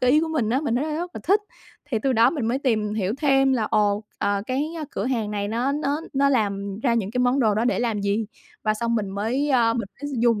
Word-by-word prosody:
cái 250 Hz, -, +3 dB
ý 300 Hz, +4 st, +5 dB
của 325 Hz, -, -1 dB
mình 250 Hz, -9 st, 0 dB
á, 260 Hz, +3 st, +2 dB
mình 290 Hz, -6 st, -1 dB
thấy 275 Hz, -, 0 dB
rất 310 Hz, -, -3 dB
rất 350 Hz, 0 st, -4 dB
là -, -, -6 dB
thích, 395 Hz, +3 st, +4 dB, 0.4 s
thì 260 Hz, -6 st, -1 dB
từ 270 Hz, -, +2 dB
đó 230 Hz, -1 st, +5 dB
mình 280 Hz, -9 st, -2 dB
mới 245 Hz, +3 st, 0 dB
tìm 215 Hz, -6 st, 0 dB
hiểu 205 Hz, 0 st, -1 dB
thêm 270 Hz, -2 st, +3 dB
là 245 Hz, -4 st, +1 dB
ồ, 210 Hz, 0 st, +1 dB
ờ, 200 Hz, 0 st, 0 dB
cái, 265 Hz, +3 st, 0 dB
ơ, 310 Hz, -, -3 dB
cửa 195 Hz, -, -3 dB
hàng 230 Hz, -5 st, -1 dB
này 205 Hz, -1 st, -2 dB
nó 240 Hz, +5 st, 0 dB
nó 290 Hz, +1 st, -1 dB
nó 280 Hz, 0 st, +3 dB
làm 200 Hz, -5 st, 0 dB
ra 235 Hz, -2 st, +2 dB
những 210 Hz, -4 st, -1 dB
cái 250 Hz, -, -3 dB
món 250 Hz, +2 st, +2 dB
đồ 215 Hz, -4 st, +3 dB
đó 220 Hz, +3 st, +1 dB
để 245 Hz, -, +1 dB
làm 230 Hz, -4 st, 0 dB
gì 200 Hz, +2 st, 0 dB, 0.4 s
và 215 Hz, 0 st, +1 dB
xong 235 Hz, +2 st, -1 dB
mình 210 Hz, -4 st, -1 dB
mới, 230 Hz, +9 st, -1 dB
ơ, 235 Hz, -3 st, +3 dB
mình 230 Hz, -4 st, -3 dB
mới 290 Hz, -, -3 dB
dùng 230 Hz, -3 st, +3 dB
235 Hz, 275 wpm, -24 LUFS, 210-270 Hz, 0.4 s, ý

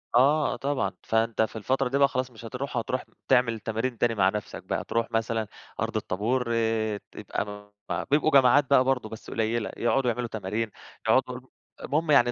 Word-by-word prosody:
آه، 145 Hz, +4 st, +4 dB
آه -, -, -3 dB
طبعًا، 140 Hz, 0 st, -1 dB
فأنت 110 Hz, 0 st, +1 dB
في 110 Hz, -, 0 dB
الفترة 130 Hz, +4 st, 0 dB
دي 140 Hz, -, +1 dB
بقى 140 Hz, 0 st, +6 dB
خلاص 130 Hz, 0 st, -2 dB
مش 115 Hz, 0 st, -12 dB
هتروح، 130 Hz, +2 st, -4 dB
هتروح 125 Hz, +2 st, -1 dB, 0.2 s
تعمل 115 Hz, -3 st, +3 dB
تمارين 115 Hz, +3 st, -2 dB
تاني 115 Hz, 0 st, +1 dB
مع 95 Hz, -2 st, +4 dB
نفْسك 105 Hz, 0 st, -5 dB
بقى، -, -, -2 dB
تروح 115 Hz, 0 st, -1 dB
مثلًا 115 Hz, -1 st, 0 dB, 0.3 s
أرض -, -, -2 dB
الطابور 120 Hz, +7 st, -1 dB
آآ 110 Hz, -2 st, 0 dB
تبقى -, -, -4 dB, 0.5 s
م -, -, -1 dB
بيبقوا 155 Hz, +2 st, +3 dB
جماعات 135 Hz, +1 st, +5 dB
بقى 130 Hz, -2 st, +6 dB
برضه 125 Hz, -4 st, 0 dB
بس 110 Hz, -, -9 dB
قليّلة، 115 Hz, 0 st, -1 dB
يقعدوا 125 Hz, +1 st, +2 dB
يعملوا 120 Hz, +1 st, -3 dB
تمارين، 110 Hz, +1 st, -3 dB, 0.4 s
يقعدوا -, -, +3 dB
يرو -, -, -12 dB, 0.3 s
المُهم 155 Hz, +1 st, 0 dB
يعني 120 Hz, -3 st, +6 dB
120 Hz, 185 wpm, -27 LUFS, 110-130 Hz, 0.5 s, بقى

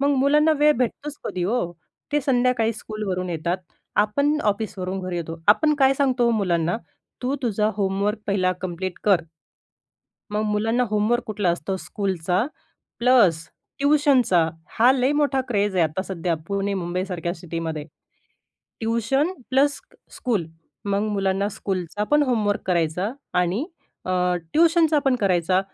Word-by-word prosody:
मग 280 Hz, 0 st, +3 dB
मुलांना 300 Hz, +4 st, +4 dB
वेळ 300 Hz, +1 st, +6 dB
भेटतोच 275 Hz, +4 st, -2 dB
कधी 180 Hz, -, -2 dB
ओ. 190 Hz, -3 st, -1 dB, 0.4 s
ते 295 Hz, -, +3 dB
संध्याकाळी 245 Hz, -3 st, +2 dB
स्कूलवरून 205 Hz, -4 st, -4 dB
येतात. 170 Hz, +2 st, -1 dB, 0.5 s
आपण 285 Hz, +8 st, +1 dB
ऑफिसवरून 195 Hz, -3 st, -2 dB
घरी 185 Hz, -1 st, -4 dB
येतो. 165 Hz, -1 st, -5 dB
आपण 300 Hz, +8 st, +5 dB
काय 270 Hz, 0 st, +5 dB
सांगतो 260 Hz, -3 st, +2 dB
ओ -, -, +3 dB
मुलांना. 175 Hz, -5 st, +1 dB, 0.5 s
तू 255 Hz, +2 st, 0 dB
तुझा 215 Hz, -2 st, +1 dB
होमवर्क 200 Hz, +1 st, 0 dB
पहिला 185 Hz, -2 st, +1 dB
कंप्लीट 185 Hz, 0 st, -4 dB
कर. 195 Hz, -4 st, +4 dB, 1.1 s
मग 210 Hz, -, 0 dB
मुलांना 225 Hz, +4 st, +1 dB
होमवर्क 215 Hz, +3 st, +1 dB
कुठला 205 Hz, -4 st, 0 dB
असतो 185 Hz, +3 st, -2 dB
स्कूलचा 190 Hz, 0 st, -1 dB, 0.5 s
प्लस 210 Hz, -10 st, +4 dB, 0.3 s
ट्युशनचा. 275 Hz, -, +3 dB, 0.3 s
हा 240 Hz, +3 st, +6 dB
लय 260 Hz, 0 st, +2 dB
मोठा 290 Hz, -2 st, +2 dB
क्रेझ 205 Hz, -4 st, 0 dB
आहे 175 Hz, -, +4 dB
आता 160 Hz, +4 st, -1 dB
सध्या 175 Hz, -3 st, -2 dB
पुणे, 200 Hz, 0 st, -1 dB
मुंबईसारख्या 180 Hz, -1 st, -3 dB
सिटीमध्ये. 165 Hz, -3 st, -4 dB, 1.0 s
Tuition 235 Hz, -, +1 dB, 0.2 s
plus 275 Hz, +2 st, +3 dB
स्क -, -, -22 dB, 0.2 s
school. 215 Hz, -9 st, -1 dB, 0.4 s
मग 200 Hz, 0 st, 0 dB
मुलांना 195 Hz, 0 st, 0 dB
स्कूलचा 190 Hz, -1 st, -3 dB
पण 295 Hz, 0 st, +5 dB
होमवर्क 220 Hz, -6 st, 0 dB
करायचा 180 Hz, +3 st, 0 dB, 0.3 s
आणि 180 Hz, -, 0 dB, 0.4 s
अ, 185 Hz, -, -2 dB, 0.4 s
ट्युशनचा 325 Hz, -2 st, +4 dB
पण 265 Hz, -, +4 dB
करायचा. 185 Hz, -4 st, +2 dB
210 Hz, 135 wpm, -23 LUFS, 185-255 Hz, 1.1 s, वेळ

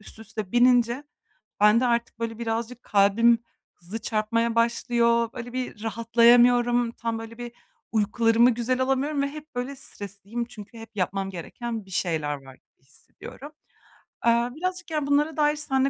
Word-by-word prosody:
üst 215 Hz, -, -10 dB
üste 215 Hz, -3 st, -7 dB
binince 245 Hz, +2 st, +3 dB, 0.6 s
bende 215 Hz, +4 st, +5 dB
artık 235 Hz, -1 st, -1 dB
böyle, 230 Hz, -1 st, -4 dB
birazcık 235 Hz, +1 st, -3 dB
kalbim 210 Hz, +4 st, +4 dB, 0.4 s
hızlı 180 Hz, +6 st, -7 dB
çarpmaya 230 Hz, +2 st, 0 dB
başlıyor. 235 Hz, 0 st, +2 dB
Böyle 245 Hz, -1 st, -7 dB
bir 250 Hz, -4 st, -5 dB
rahatlayamıyorum, 240 Hz, +1 st, +4 dB
tam, 230 Hz, -1 st, -3 dB
böyle 225 Hz, +1 st, -9 dB
bir, 240 Hz, -1 st, -7 dB, 0.4 s
uykularımı 225 Hz, +2 st, +3 dB
güzel 245 Hz, +2 st, -1 dB
alamıyorum 270 Hz, +3 st, 0 dB
ve 280 Hz, -, 0 dB
hep, 305 Hz, +1 st, -11 dB
böyle, 250 Hz, +3 st, -4 dB
stresliyim 205 Hz, -1 st, -6 dB
çünkü 230 Hz, -1 st, -12 dB
hep 225 Hz, 0 st, -11 dB
yapmam 195 Hz, 0 st, -1 dB
gereken 220 Hz, +5 st, -6 dB
bir -, -, -16 dB
şeyler 160 Hz, -5 st, -1 dB
var 135 Hz, -1 st, -13 dB
gibi -, -, -32 dB
hissediyorum. 265 Hz, -, -12 dB, 0.7 s
Iıı, 235 Hz, +2 st, +2 dB
birazcık, 365 Hz, +1 st, -4 dB
yani, 305 Hz, -3 st, -1 dB
bunlara 295 Hz, +2 st, +1 dB
dair 295 Hz, 0 st, +3 dB
seninle 270 Hz, -2 st, +1 dB
235 Hz, 145 wpm, -25 LUFS, 220-250 Hz, 0.7 s, bende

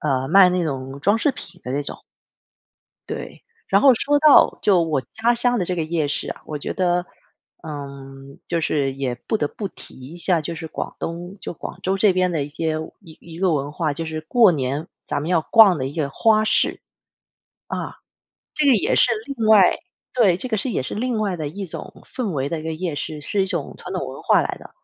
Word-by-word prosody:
呃， 135 Hz, -3 st, 0 dB
卖 190 Hz, +3 st, +7 dB
那 180 Hz, -1 st, 0 dB
种 135 Hz, -2 st, -5 dB
装 200 Hz, +8 st, +3 dB
饰 255 Hz, +6 st, +2 dB
品 180 Hz, -, -7 dB
的 125 Hz, -, -5 dB
那 140 Hz, -, 0 dB
种。 -, -, -8 dB, 1.1 s
对， -, -, -7 dB, 0.3 s
然 195 Hz, -, +4 dB
后 270 Hz, -2 st, +7 dB
说 290 Hz, +5 st, +2 dB
到， 305 Hz, -1 st, +6 dB
就 195 Hz, -4 st, +4 dB
我 155 Hz, -4 st, 0 dB
家 235 Hz, +2 st, +2 dB
乡 245 Hz, 0 st, +1 dB
的 185 Hz, -, 0 dB
这 180 Hz, -, -2 dB
个 165 Hz, -, 0 dB
夜 160 Hz, -2 st, -1 dB
市 145 Hz, -, -2 dB
啊， -, -, -7 dB
我 150 Hz, -, -4 dB
觉 -, -, -4 dB
得， 180 Hz, -1 st, +1 dB, 0.6 s
嗯， 140 Hz, -2 st, -9 dB
就 170 Hz, -1 st, -1 dB
是 140 Hz, -4 st, 0 dB
也 135 Hz, -2 st, -2 dB
不 220 Hz, -, +1 dB
得 150 Hz, -, 0 dB
不 200 Hz, +5 st, -5 dB
提 -, -, -9 dB
一 135 Hz, +7 st, -10 dB
下， 175 Hz, -1 st, +1 dB
就 160 Hz, +2 st, -4 dB
是 160 Hz, 0 st, -6 dB
广 -, -, -5 dB
东 175 Hz, +3 st, -6 dB
就 -, -, -5 dB
广 -, -, -8 dB
州 190 Hz, +1 st, 0 dB
这 200 Hz, -1 st, +5 dB
边 185 Hz, 0 st, +1 dB
的 155 Hz, -4 st, 0 dB
一 -, -, -8 dB
些， 155 Hz, +1 st, -2 dB, 0.2 s
一 165 Hz, -6 st, -15 dB
一 165 Hz, -1 st, -11 dB
个 185 Hz, -2 st, +2 dB
文 145 Hz, -1 st, -1 dB
化， 155 Hz, -1 st, -1 dB
就 165 Hz, +3 st, -5 dB
是 160 Hz, 0 st, -4 dB
过 220 Hz, +4 st, +5 dB
年， 140 Hz, +1 st, -2 dB, 0.2 s
咱 -, -, -2 dB
们 150 Hz, -, -4 dB
要 175 Hz, -2 st, +3 dB
逛 200 Hz, +3 st, +6 dB
的 130 Hz, -, -2 dB
一 140 Hz, -, -6 dB
个 155 Hz, -4 st, -1 dB
花 215 Hz, +6 st, +3 dB
市。 -, -, +2 dB, 0.9 s
啊， -, -, -4 dB, 0.6 s
这 305 Hz, -, +1 dB
个 270 Hz, -, +6 dB
也 215 Hz, -, +1 dB
是 245 Hz, -, +4 dB
另 250 Hz, -6 st, -3 dB
外 210 Hz, -4 st, +6 dB, 0.4 s
对， 210 Hz, -9 st, +4 dB
这 255 Hz, -, -5 dB
个 220 Hz, -, 0 dB
是 245 Hz, +5 st, -2 dB
也 175 Hz, -, -1 dB
是 130 Hz, -, -5 dB
另 240 Hz, +1 st, -1 dB
外 200 Hz, -4 st, -1 dB
的 155 Hz, -3 st, -4 dB
一 195 Hz, +6 st, -6 dB
种 165 Hz, -, -8 dB
氛 245 Hz, -6 st, -3 dB
围 140 Hz, -4 st, -2 dB
的 165 Hz, -, -3 dB
一 -, -, -9 dB
个 160 Hz, -, -3 dB
夜 165 Hz, 0 st, -3 dB
市， 150 Hz, +1 st, -5 dB
是 195 Hz, +6 st, 0 dB
一 -, -, -1 dB
种 170 Hz, -7 st, -3 dB
传 -, -, -8 dB
统 -, -, -3 dB
文 -, -, -8 dB
化 -, -, +4 dB
来 -, -, -3 dB
的。 -, -, -13 dB
170 Hz, 245 characters per minute, -22 LUFS, 150-205 Hz, 1.1 s, 卖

